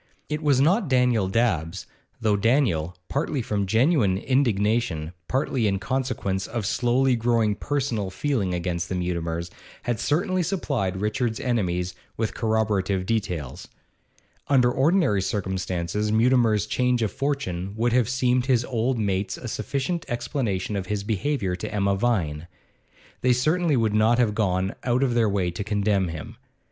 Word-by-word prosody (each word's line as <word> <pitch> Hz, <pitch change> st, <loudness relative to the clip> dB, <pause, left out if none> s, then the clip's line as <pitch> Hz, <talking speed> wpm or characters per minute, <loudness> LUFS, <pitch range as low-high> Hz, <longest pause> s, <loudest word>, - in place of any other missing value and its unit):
It 150 Hz, 0 st, -2 dB
was 145 Hz, -4 st, +3 dB
not 180 Hz, -, +3 dB
Daniel 125 Hz, -6 st, +3 dB
Dabbs, 95 Hz, -7 st, 0 dB, 0.3 s
though 110 Hz, -2 st, +2 dB
Daniel, 100 Hz, -, +1 dB
partly 140 Hz, -2 st, -1 dB
from 100 Hz, -3 st, -1 dB
genuine 115 Hz, -, +3 dB
indignation, 105 Hz, -, 0 dB
partly 130 Hz, -3 st, 0 dB
in 100 Hz, -1 st, +1 dB
consequence 100 Hz, -5 st, -2 dB
of 115 Hz, -3 st, -3 dB
slowly 125 Hz, +4 st, +2 dB
growing 115 Hz, -2 st, +2 dB
personal 125 Hz, -6 st, -2 dB
feeling 110 Hz, -3 st, -1 dB
against 85 Hz, -1 st, -2 dB
the 95 Hz, -, -2 dB
Mutimers, 85 Hz, -1 st, -2 dB, 0.3 s
had 120 Hz, -3 st, -1 dB
certainly 180 Hz, +4 st, +1 dB
supplied 140 Hz, -, -1 dB
Richard's 110 Hz, +2 st, -1 dB
enemies 90 Hz, -7 st, -1 dB, 0.2 s
with 110 Hz, -1 st, -1 dB
corroborative 105 Hz, -4 st, 0 dB
details. 90 Hz, -, -3 dB, 0.8 s
Under 125 Hz, -3 st, +4 dB
ordinary 140 Hz, -, +2 dB
circumstances 95 Hz, 0 st, -2 dB
Mutimer's 115 Hz, -2 st, +3 dB
change 125 Hz, +1 st, +1 dB
of 105 Hz, -, 0 dB
fortune 100 Hz, -10 st, -3 dB
would 120 Hz, +1 st, +1 dB
have 125 Hz, -2 st, +3 dB
seemed 125 Hz, -1 st, +1 dB
to 135 Hz, -, 0 dB
his 120 Hz, 0 st, +2 dB
old 120 Hz, +1 st, 0 dB
mates 100 Hz, -2 st, -1 dB
a 125 Hz, -, -7 dB
sufficient 140 Hz, -, -2 dB
explanation 120 Hz, -5 st, -2 dB
of 95 Hz, -2 st, -3 dB
his 105 Hz, 0 st, -2 dB
behaviour 105 Hz, -2 st, -1 dB
to -, -, -5 dB
Emma 100 Hz, -1 st, +1 dB
Vine; 90 Hz, -9 st, -1 dB, 0.7 s
they 125 Hz, 0 st, +4 dB
certainly 155 Hz, +4 st, +2 dB
would 110 Hz, -3 st, +1 dB
not 110 Hz, +2 st, +4 dB
have 115 Hz, -4 st, +2 dB
gone 95 Hz, -3 st, 0 dB
out 125 Hz, +2 st, +1 dB
of 125 Hz, -3 st, +1 dB
their 115 Hz, -2 st, +3 dB
way 95 Hz, -3 st, 0 dB
to 90 Hz, +4 st, -4 dB
condemn 100 Hz, -2 st, +1 dB
him. 80 Hz, -3 st, -7 dB
110 Hz, 150 wpm, -25 LUFS, 95-125 Hz, 0.8 s, Under